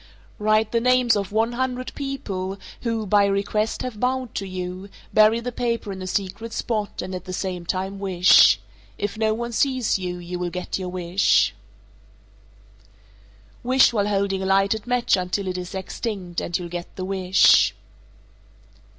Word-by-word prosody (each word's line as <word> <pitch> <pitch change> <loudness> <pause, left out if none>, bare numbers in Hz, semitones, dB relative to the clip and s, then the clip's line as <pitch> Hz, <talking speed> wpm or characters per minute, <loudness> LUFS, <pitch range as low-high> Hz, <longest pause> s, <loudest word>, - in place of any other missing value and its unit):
Write 215 +1 +2
the 230 - +1
names 250 -1 +4
of 200 -2 -2
one 225 +2 +1
hundred 255 +1 -3
people 200 -9 -4 0.2
who 230 -2 -2
(by 205 +1 +4
request) 200 +2 0
have 245 -5 -5
bowed 255 -1 -1
to 195 - -4
you, 185 +1 -6 0.2
bury 215 +2 +5
the 245 +1 -4
paper 235 -3 -2
in 190 -1 -7
a 185 - -5
secret 200 +4 -3
spot, 215 -3 -3
and 185 - -6
at 180 -1 -6
the 185 - -6
same 180 -2 -4
time 190 +2 -3
wish. 185 -2 +6 0.4
If 205 +1 -3
no 220 0 +1
one 235 +1 -4
sees 255 -3 +1
you, 180 -1 -4
you 175 0 -6
will 180 0 -2
get 180 +2 -4
your 185 -1 -4
wish. 180 +1 +2 2.1
451. 245 - -7
Wish 260 -1 +5
while 205 -2 +1
holding 195 -1 0
a - - -2
lighted 195 +3 +2
match 245 -3 +2
until 185 +1 -2
it 185 - -2
is 180 +1 -6
extinct, 190 -2 -4
and 175 - -2
you'll 175 -2 -6
get 175 0 -7
the 185 - -4
wish. 190 -1 +4
452. - - -30
200 Hz, 170 wpm, -23 LUFS, 185-230 Hz, 2.1 s, wish